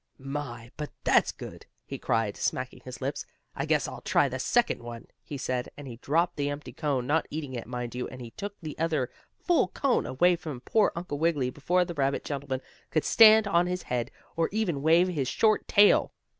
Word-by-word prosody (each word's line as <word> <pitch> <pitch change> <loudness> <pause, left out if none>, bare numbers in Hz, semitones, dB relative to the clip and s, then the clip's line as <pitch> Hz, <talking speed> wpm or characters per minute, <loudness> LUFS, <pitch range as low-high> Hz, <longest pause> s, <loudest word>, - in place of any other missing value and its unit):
"My 130 -4 -6
but 150 -1 -4
that's - - +4
good!" - - -10 0.2
he - - -6
cried, 110 -3 0
smacking - - -2
his - - -10
lips. - - -2 0.3
"I - - -3
guess - - +2
I'll - - -8
try - - +3
the - - -4
second - - +1
one," 120 -1 -8 0.2
he 145 - -7
said, 125 -1 -2
and 145 -1 -8
he 120 -3 -8
dropped 165 +7 0
the 145 0 0
empty 145 +1 -6
cone, 140 -6 -1
not 155 +4 +1
eating 145 -3 -5
it, 120 -3 -5
mind 120 -1 -5
you, 125 0 -3
and 130 - -10
he 120 -2 -8
took 205 - -6
the 155 -2 -5
other 155 -6 0 0.3
full 350 -3 +2
cone 275 -3 0
away 175 +7 +3
from 150 -7 -7
poor 215 - +2
Uncle 170 -4 -4
Wiggily 150 -6 +1
before 180 +6 +1
the 175 - -5
rabbit 140 -3 0
gentleman 135 -2 -3 0.3
could 155 - 0
stand 220 -1 +7
on 175 -2 +3
his 180 0 -3
head, 120 -1 -2 0.3
or 165 -1 +1
even 190 -9 -1
wave 165 +4 +5
his 150 -8 -1
short 215 - +2
tail. 205 0 +5
145 Hz, 205 wpm, -28 LUFS, 130-175 Hz, 0.3 s, stand